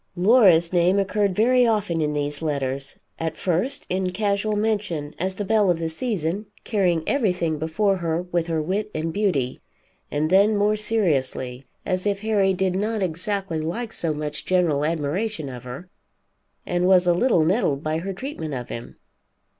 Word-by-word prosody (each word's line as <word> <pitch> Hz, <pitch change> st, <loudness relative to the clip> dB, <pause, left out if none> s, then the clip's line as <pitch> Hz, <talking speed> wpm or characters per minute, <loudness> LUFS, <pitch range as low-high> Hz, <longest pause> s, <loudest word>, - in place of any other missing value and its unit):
Laura's 185 Hz, -4 st, +5 dB
name 180 Hz, +2 st, +3 dB
occurred 200 Hz, -1 st, +1 dB
very 250 Hz, +4 st, +4 dB
often 205 Hz, -7 st, 0 dB
in 150 Hz, -1 st, 0 dB
these 145 Hz, 0 st, -2 dB
letters, 140 Hz, -3 st, -3 dB, 0.2 s
at 160 Hz, -1 st, -3 dB
first 190 Hz, +10 st, 0 dB
in 185 Hz, 0 st, -1 dB
casual 205 Hz, +2 st, 0 dB
mention 205 Hz, -9 st, -1 dB
as 185 Hz, +2 st, -2 dB
the 205 Hz, -, -3 dB
belle 215 Hz, -2 st, +3 dB
of 175 Hz, -, +3 dB
the 165 Hz, 0 st, -2 dB
season, 195 Hz, 0 st, -2 dB, 0.2 s
carrying 180 Hz, -7 st, +1 dB
everything 180 Hz, -, 0 dB
before 195 Hz, +6 st, +1 dB
her 170 Hz, -1 st, -1 dB
with 175 Hz, -2 st, -2 dB
her 165 Hz, -1 st, 0 dB
wit 195 Hz, +7 st, -2 dB
and 160 Hz, +1 st, -2 dB
beauty, 180 Hz, -12 st, 0 dB, 0.5 s
and 155 Hz, +2 st, -1 dB
then 205 Hz, +3 st, +5 dB
more 210 Hz, +1 st, +2 dB
seriously, 140 Hz, -, -1 dB, 0.2 s
as 185 Hz, +1 st, -1 dB
if 200 Hz, -1 st, -1 dB
Harry 210 Hz, -3 st, +2 dB
did 190 Hz, 0 st, 0 dB
not 210 Hz, +1 st, -1 dB
exactly 185 Hz, 0 st, -2 dB
like 215 Hz, +9 st, -4 dB
so 165 Hz, -, -1 dB
much 150 Hz, 0 st, -4 dB
general 170 Hz, -6 st, +1 dB
admiration 160 Hz, +2 st, -2 dB
of 125 Hz, -1 st, -9 dB
her, 130 Hz, +9 st, -8 dB, 0.8 s
and 180 Hz, 0 st, 0 dB
was 185 Hz, -1 st, +5 dB
a 175 Hz, -, +4 dB
little 175 Hz, -4 st, +3 dB
nettled 165 Hz, -, +1 dB
by 155 Hz, +1 st, -1 dB
her 195 Hz, +4 st, -4 dB
treatment 190 Hz, -, -5 dB
of 125 Hz, -1 st, -6 dB
him. 115 Hz, -, -7 dB
180 Hz, 170 wpm, -23 LUFS, 155-205 Hz, 0.8 s, Laura's